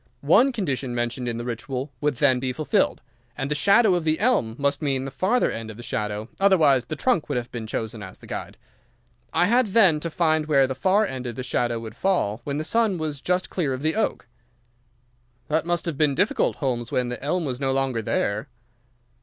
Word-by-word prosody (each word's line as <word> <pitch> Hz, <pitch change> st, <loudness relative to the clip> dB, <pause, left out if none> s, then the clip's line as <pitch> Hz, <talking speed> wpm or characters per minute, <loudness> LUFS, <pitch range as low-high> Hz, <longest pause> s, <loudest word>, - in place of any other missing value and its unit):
One 270 Hz, +2 st, +5 dB
condition 140 Hz, -, -2 dB
mentioned 120 Hz, +1 st, -2 dB
in 115 Hz, -1 st, -2 dB
the 120 Hz, -, -5 dB
Ritual 125 Hz, +3 st, -4 dB
would 150 Hz, -2 st, +1 dB
then 130 Hz, -1 st, +3 dB
be 130 Hz, 0 st, -2 dB
fulfilled. 155 Hz, +3 st, 0 dB, 0.4 s
And 135 Hz, +2 st, -3 dB
the -, -, +4 dB
shadow 200 Hz, +7 st, +4 dB
of 175 Hz, -2 st, 0 dB
the 155 Hz, 0 st, +1 dB
elm 200 Hz, -, +2 dB
must 140 Hz, +1 st, 0 dB
mean 135 Hz, -3 st, -1 dB
the 135 Hz, -, -5 dB
farther 205 Hz, -, +1 dB
end 110 Hz, 0 st, -6 dB
of 110 Hz, -, -9 dB
the 120 Hz, -, -9 dB
shadow, 105 Hz, -1 st, -3 dB
otherwise 155 Hz, -10 st, +4 dB
the 155 Hz, -, -4 dB
trunk 195 Hz, -, 0 dB
would -, -, 0 dB
have 120 Hz, -1 st, -4 dB
been 115 Hz, -2 st, -5 dB
chosen 110 Hz, 0 st, -4 dB
as 95 Hz, -2 st, -9 dB
the -, -, -15 dB
guide. -, -, -6 dB, 0.7 s
I 175 Hz, -, +3 dB
had, 240 Hz, +4 st, +3 dB
then, 190 Hz, -7 st, +4 dB
to 170 Hz, -, -4 dB
find 155 Hz, -2 st, +1 dB
where 140 Hz, -3 st, +4 dB
the 130 Hz, -, -2 dB
far 190 Hz, +10 st, +2 dB
end 130 Hz, -8 st, -5 dB
of 120 Hz, -, -5 dB
the 130 Hz, -, -5 dB
shadow 120 Hz, -2 st, -1 dB
would 115 Hz, -1 st, -8 dB
fall 125 Hz, -, 0 dB
when 140 Hz, 0 st, -2 dB
the 155 Hz, -, -2 dB
sun 220 Hz, +1 st, +1 dB
was 155 Hz, -4 st, -3 dB
just 180 Hz, +2 st, -1 dB
clear 150 Hz, -8 st, -1 dB
of 130 Hz, +2 st, -5 dB
the 160 Hz, +1 st, +1 dB
oak." 220 Hz, -, -1 dB, 1.2 s
"That 160 Hz, +2 st, 0 dB
must 175 Hz, 0 st, 0 dB
have 165 Hz, -5 st, -3 dB
been 150 Hz, -3 st, +3 dB
difficult, 200 Hz, -, +1 dB
Holmes, 120 Hz, -4 st, -2 dB
when 125 Hz, -1 st, 0 dB
the 125 Hz, -, -6 dB
elm 170 Hz, +4 st, 0 dB
was 130 Hz, -3 st, -3 dB
no 135 Hz, -1 st, 0 dB
longer 135 Hz, -3 st, 0 dB
there." 105 Hz, 0 st, -1 dB
140 Hz, 220 wpm, -24 LUFS, 125-175 Hz, 1.2 s, One